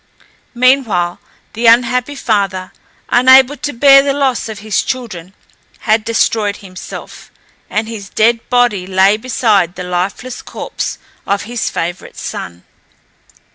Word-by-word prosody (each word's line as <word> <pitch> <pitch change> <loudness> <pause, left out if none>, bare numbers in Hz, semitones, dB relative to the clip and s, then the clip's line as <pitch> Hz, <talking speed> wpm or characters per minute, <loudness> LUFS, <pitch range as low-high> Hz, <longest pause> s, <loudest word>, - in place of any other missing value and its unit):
Meanwhile 235 -9 +2 0.3
the 230 +2 0
unhappy 250 +4 +3
father, 195 -7 -1 0.4
unable 260 +2 +6
to 290 +3 -3
bear 275 +2 +6
the 275 0 0
loss 265 -5 0
of 220 - -6
his 215 +1 -1
children, 195 -8 -6 0.5
had 215 0 +2
destroyed 215 -2 0
himself, 185 -2 -10 0.4
and 215 +1 -1
his 210 -4 -8
dead 230 +2 +2
body 240 -7 +1
lay 190 +2 +4
beside 215 -6 +1
the 180 - -6
lifeless 185 +8 -3
corpse - - -5 0.3
of 200 0 0
his 235 +1 -3
favourite 175 +2 -5
son. 85 0 -7
220 Hz, 125 wpm, -15 LUFS, 195-250 Hz, 0.5 s, unable